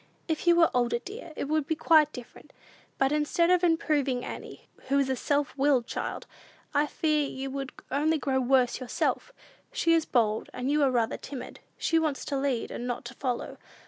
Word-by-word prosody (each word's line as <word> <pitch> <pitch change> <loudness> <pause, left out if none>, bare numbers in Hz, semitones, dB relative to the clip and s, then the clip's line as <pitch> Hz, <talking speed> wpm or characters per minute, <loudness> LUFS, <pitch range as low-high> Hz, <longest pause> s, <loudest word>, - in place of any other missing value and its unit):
"If 320 +1 -2
you 345 - +7
were 335 -1 +5
older, 240 -1 +2
dear, 390 - -9
it - - -3
would 305 -1 0
be 320 - 0
quite 310 -1 +4
different. 245 -4 -12 0.4
But, 270 0 +2
instead 300 +3 +2
of 360 -1 +3
improving 290 -7 +1
Annie, - - -8 0.2
who 275 +1 +2
is 275 -1 +2
a - - +1
self 285 +3 -1
willed 270 -3 +3
child, - - -4 0.5
I 295 +1 +2
fear 300 -2 0
you 270 0 -5
would 275 -1 -4 0.2
only 305 +4 +2
grow 265 -2 0
worse 255 -1 +2
yourself. 255 - -1 0.4
She 335 -9 +2
is 325 -1 +3
bold, 220 -3 +1
and 255 +3 -1
you 300 0 +2
are 275 - +4
rather 235 -3 0
timid. 270 -2 -8 0.2
She 330 - +2
wants 310 -4 -1
to 285 - -2
lead, 270 -4 -1
and 245 - -5
not 245 0 -4
to 240 - -7
follow. 255 -2 -4
280 Hz, 195 wpm, -28 LUFS, 255-310 Hz, 0.5 s, you